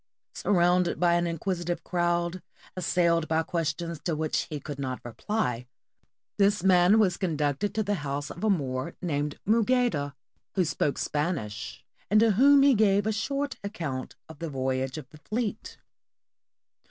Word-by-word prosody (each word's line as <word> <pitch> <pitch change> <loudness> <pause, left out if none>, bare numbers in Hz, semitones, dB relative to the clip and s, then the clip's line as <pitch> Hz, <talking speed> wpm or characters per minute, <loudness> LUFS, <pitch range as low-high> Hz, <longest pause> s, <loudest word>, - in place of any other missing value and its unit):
Surrounded 180 -2 +2
by 175 -1 +4
an 175 0 +2
inquisitive 175 +1 -2
crowd, 175 0 0 0.3
assailed 170 -2 +1
by 160 0 +1
questions 165 0 -3
to 165 +1 -2
which 155 0 -1
he 150 -2 -4
could 145 0 -7
not 130 -2 -3
reply, 125 - -2 0.7
this 200 -2 +3
man 185 +2 +5
was 195 -5 +3
conducted 155 +1 -1
to 220 - +1
the 205 0 -1
house 145 0 -3
of 175 - -9
a 220 - +3
Moor 130 -8 -1
named 150 -4 -2
Mougaida, 220 - +2 0.4
who 185 -3 +2
spoke 145 -2 -1
Spanish 135 - -3 0.2
and 215 - +5
to 225 0 +5
whom 275 +6 +6
he 280 -1 +6
gave 205 -2 +3
a 220 - +1
short 275 +6 -2
account 165 -11 -5
of 160 -2 -12
the 165 - -4
voyage 130 0 -2
of 150 -5 -8
the 155 - -14
fleet. 215 +6 -4
175 Hz, 155 wpm, -27 LUFS, 145-200 Hz, 0.7 s, whom